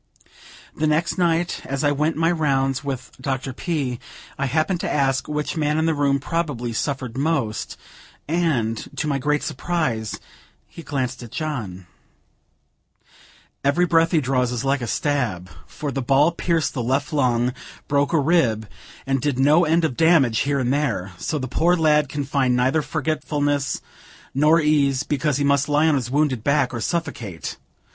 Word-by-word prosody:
The 155 - 0
next 160 +4 0
night, 170 0 +1
as 135 +1 -3
I 145 - +3
went 150 +3 0
my 165 +1 +3
rounds 135 -4 0
with 130 -5 -5
Dr. 130 -1 -3
P., 135 -5 -2 0.4
I 140 - -1
happened 155 +6 0
to - - -2
ask 135 -2 +1
which 150 +2 -2
man 150 -1 0
in 160 - +1
the 165 - +2
room 140 -2 +1
probably 145 -6 -2
suffered 130 -1 -3
most; 140 -8 -1 0.5
and, 140 -10 0
to - - -2
my 140 -2 0
great 150 +2 0
surprise, 130 - -2 0.5
he - - -11
glanced 130 -4 -3
at 120 - -9
John: 115 - -4 1.8
"Every 140 +6 +3
breath 165 -1 +3
he 165 - +3
draws 125 -2 0
is 125 +2 -3
like 135 0 +1
a 120 - -3
stab; 110 - -1 0.2
for 145 -2 -5
the 135 - -2
ball 140 +5 +4
pierced 170 -2 0
the 130 - -2
left 135 +5 -1
lung, 125 -3 +2 0.3
broke 145 0 +1
a 160 - +3
rib, 135 -9 +2 0.4
and 135 -1 0
did 145 -3 0
no 150 +6 +4
end 165 +1 +2
of 130 - -2
damage 155 -9 +4
here 140 0 +1
and 130 -1 +1
there; 140 -11 -1
so 155 - -2
the 130 -2 -3
poor 170 +8 +2
lad 150 -4 +3
can 145 0 -3
find 135 -3 +1
neither 130 +5 +2
forgetfulness 145 -2 -1 0.5
nor 150 +4 +4
ease, 145 -4 +2
because 150 -1 0
he 145 - 0
must 140 0 +2
lie 150 +2 +3
on 160 - +4
his 130 -4 -1
wounded 135 -4 +1
back 140 -2 +2
or 120 - -3
suffocate. 115 - -4
140 Hz, 170 wpm, -22 LUFS, 130-155 Hz, 1.8 s, ball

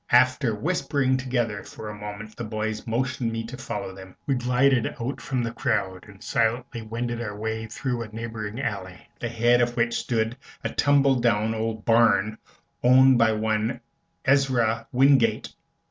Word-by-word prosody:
After 130 -1 +4
whispering 140 - 0
together 120 -6 -1
for 110 - -9
a 105 - -5
moment 105 +1 -8
the 120 - -5
boys 110 0 -3
motioned 120 0 -1
me 115 0 -3
to 120 +3 -7
follow 125 -6 -5
them. 95 -1 -12
We 140 - +1
glided 125 0 +2
out 125 +4 -4
from 130 -2 -2
the 115 - -2
crowd 105 -7 -1
and 100 -2 -14
silently 115 +1 0
wended 115 +2 -4
our 105 -3 -5
way 110 +1 -3
through 125 +1 -3
a 115 - -5
neighboring 110 0 -6
alley, 100 -8 -4 0.2
at - - -38
the 120 - -3
head 120 +1 +3
of 120 0 0
which 120 0 +2
stood 115 0 -1 0.3
a - - -1
tumble 140 -2 +3
down 110 -2 +2
old 110 -1 -3
barn, 110 -2 +3 0.4
owned 130 0 +6
by 110 -1 +4
one 110 +2 -1 0.5
Ezra 125 -5 +2
Wingate. 125 -4 +3
115 Hz, 165 wpm, -25 LUFS, 110-125 Hz, 0.5 s, owned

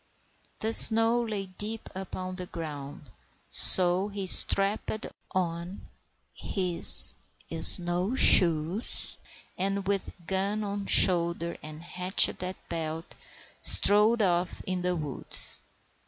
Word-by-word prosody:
The 220 +1 -3
snow 225 +2 +6
lay 215 -4 -6
deep 210 +4 -8
upon 185 -1 -9
the 180 -1 -9
ground, 145 -5 -11 0.4
so 180 +1 +7
he 200 -2 -8
strapped 200 +3 -1 0.3
on 175 0 -6 0.5
his 180 -3 +2 0.4
snow 175 +5 0
shoes, 170 -1 +1 0.4
and, 195 +1 -4
with 200 -1 -3
gun 195 +4 -4
on 200 -1 -7
shoulder 170 -1 +1
and 155 +1 -12
hatchet 180 +2 +1
at 185 0 -9
belt, 165 0 -8 0.5
strode 215 +2 +2
off 175 -1 -3
into 180 -1 -5
the 180 - -3
woods. 150 -5 +1
185 Hz, 105 wpm, -25 LUFS, 170-200 Hz, 0.5 s, so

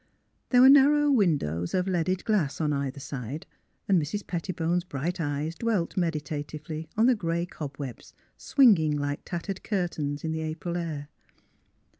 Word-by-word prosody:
There 250 -1 +5
were 260 - +9
narrow 290 +1 +6
^vindows 145 - +1
of 180 +1 0
leaded 185 0 0
glass 195 -11 +1
on 150 -2 +1
either 140 0 -3
side, 135 +1 -6 0.4
and 190 -4 +4
Mrs. 165 +8 -4
Pettibone's 175 0 -1
bright 175 +2 -3
eyes 145 +1 -2
dwelt 210 -3 -1
meditatively 155 -1 -3
on 220 - +5
the 255 - +6
grey 170 -5 -1
cob 145 -5 -7
webs, 135 -5 -8 0.2
swinging 175 - +4
like 145 0 -2
tattered 185 +2 -4
curtains 160 -8 -2
in 160 - -2
the 160 0 -2
April 160 +2 -4
air. 155 -4 -4
165 Hz, 150 wpm, -27 LUFS, 145-190 Hz, 0.4 s, were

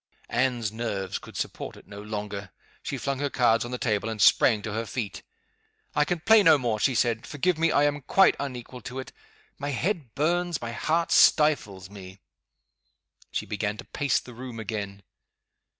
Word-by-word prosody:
Anne's 120 -3 0
nerves 105 -4 -3
could - - -11
support - - -5
it - - -16
no 100 0 -9
longer. 105 -2 -5 0.3
She - - -4
flung 140 -1 -2
her 145 0 0
cards 115 -3 +3
on 120 - -6
the 125 - -3
table, 110 -3 -1
and 110 -1 -5
sprang 105 0 +5
to 110 - -4
her 115 +1 -3
feet. 105 -6 -4 0.7
"I 150 - +3
can 170 +1 -2
play 220 +4 +6
no 160 -5 +6
more," 120 -5 -1
she 130 +4 +2
said. 115 0 +1
"Forgive 160 +3 0
me 165 0 +3
I 145 - +3
am 145 0 +1
quite 195 +8 +4
unequal 125 -2 -6
to 125 +4 -7
it. 130 - -7 0.5
My 145 - -3
head 145 - -2
burns! 175 +3 0
my 115 0 -5
heart 160 +8 0
stifles 105 - +3
me!" 95 -1 -11 1.1
She - - -3
began 105 0 -3
to 120 - -9
pace 145 -1 0
the 125 - -12
room 120 -1 -8
again. 100 -2 -5
120 Hz, 180 wpm, -26 LUFS, 105-145 Hz, 1.1 s, play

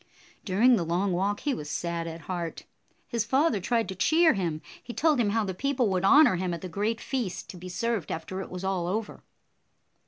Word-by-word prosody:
During 225 +6 +4
the 175 - 0
long 175 +4 0
walk, 200 +3 0
he 290 - 0
was 150 -9 -6
sad 170 +2 -3
at 165 0 -7
heart. 170 0 -5 0.4
His 235 -2 -1
55 225 - -16
father 270 -3 +3
tried 230 +4 0
to 190 - -4
cheer 320 - +4
him. 170 -5 -2 0.2
He 240 - -8
told 305 -1 +2
him 220 -4 +2
how 220 +2 +1
the 190 -2 -3
people 255 +2 0
would 185 -1 0
honor 280 - +6
him 180 -1 -1
at 170 - -9
the 185 - -5
great 210 +5 -1
feast, 240 -9 -4
to 185 - -11
be 180 +1 -8
served 215 0 -2
after 185 +4 -4
it - - -7
was 180 +1 -7
all 190 -3 -1
over. 210 +4 -3
195 Hz, 220 wpm, -27 LUFS, 175-235 Hz, 0.4 s, honor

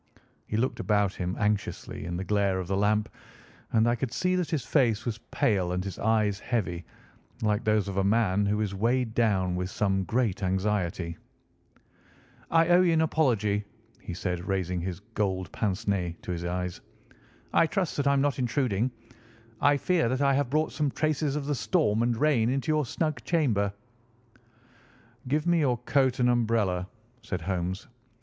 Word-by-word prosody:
He 105 - -2
looked 125 +4 0
about 105 -2 +1
him 90 0 -3
anxiously 105 -5 -2
in 85 0 -3
the 95 - -3
glare 100 -1 +1
of 90 - -4
the 95 - 0
lamp, 105 +2 +2 0.6
and 110 0 +3
I 120 - +3
could 120 0 -2
see 185 +7 0
that 180 -3 -1
his 150 -7 -2
face 115 -7 +2
was 115 -2 -3
pale 95 -5 +1
and 90 0 -1
his 100 -1 -6
eyes 105 -2 +1
heavy, 90 -9 -2 0.6
like 105 +1 +1
those 105 -2 +2
of 100 -1 -4
a 95 - +3
man 100 -1 +2
who 105 +1 +1
is 100 -2 -1
weighed 115 +3 0
down 95 -6 +1
with 90 0 -2
some 95 -1 0
great 115 -4 0
anxiety. 95 -3 -1 1.3
"I 165 0 +4
owe 175 +1 +6
you 175 -2 +3
an 160 - +3
apology," 110 -10 +1 0.4
he 90 - -6
said, 90 0 -3
raising 90 -2 -1
his 95 +1 -4
golden 95 -4 -1
pince 105 0 -2
nez 90 -4 0
to - - -4
his 85 0 -3
eyes. 90 0 -3 0.7
"I 165 - +5
trust 180 +1 -1
that 140 -1 +1
I 140 - +5
am 140 - +2
not 140 -1 0
intruding. 125 -3 0 0.7
I 145 0 +4
fear 170 -5 +1
that 130 +1 0
I 140 -1 +4
have 140 -2 +1
brought 155 +3 +1
some 145 +1 0
traces 155 0 0
of 150 -2 -2
the 145 - 0
storm 125 - +1
and 120 -1 +1
rain 125 -5 +3
into 135 +4 0
your 150 -4 +1
snug 155 +3 -2
chamber." 115 - +1 1.6
"Give 150 +4 0
me 175 -1 +3
your 130 -5 +2
coat 130 +1 +1
and 125 - +3
umbrella," 110 -6 +1 0.3
said 100 -8 -4
Holmes. 90 +1 -3
110 Hz, 180 wpm, -28 LUFS, 95-135 Hz, 1.6 s, owe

